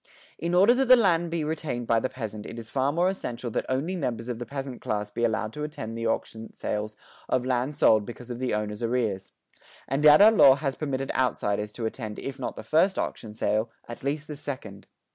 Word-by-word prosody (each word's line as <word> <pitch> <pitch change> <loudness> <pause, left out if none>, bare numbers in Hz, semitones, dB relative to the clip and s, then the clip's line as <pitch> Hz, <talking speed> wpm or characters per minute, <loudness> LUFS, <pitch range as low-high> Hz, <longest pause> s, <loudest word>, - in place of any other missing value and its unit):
In 170 +1 -1
order 200 +6 +6
that 265 +1 +1
the 255 - +10
land 175 -7 +2
be 165 -1 -1
retained 150 -6 -3
by 115 0 +3
the 130 - -2
peasant 110 -4 -6
it 115 - -8
is 115 -1 -9
far 135 +1 +1
more 170 +4 +2
essential 125 -11 -3
that - - -2
only 140 +8 -1
members 125 -7 -3
of 120 -2 -3
the 120 - -6
peasant 135 -1 -6
class 105 -1 -2
be 120 - -3
allowed 110 -1 0
to 150 - -5
attend 145 -7 -5
the 115 0 -2
auction 115 0 -3
sales 105 0 -3 0.3
of 125 -1 +1
land 130 +3 0
sold 110 -7 +5
because 120 +3 -9
of 120 - -5
the 130 -1 -1
owner's 105 0 -2
arrears. 115 -5 -1 0.6
And 135 +3 -1
yet 150 0 +9
our 210 +2 +9
law 140 -11 +7
has 140 -1 -2
permitted 135 -3 -3
outsiders 105 -4 0
to 115 - -4
attend 110 -2 -5
if 135 0 -6
not 125 - -4
the - - -8
first 185 +5 +2
auction 110 - -3
sale, 110 +1 0 0.2
at 120 - -9
least 145 +2 -2
the 150 - -6
second. 130 -9 -7
125 Hz, 220 wpm, -27 LUFS, 110-150 Hz, 0.6 s, the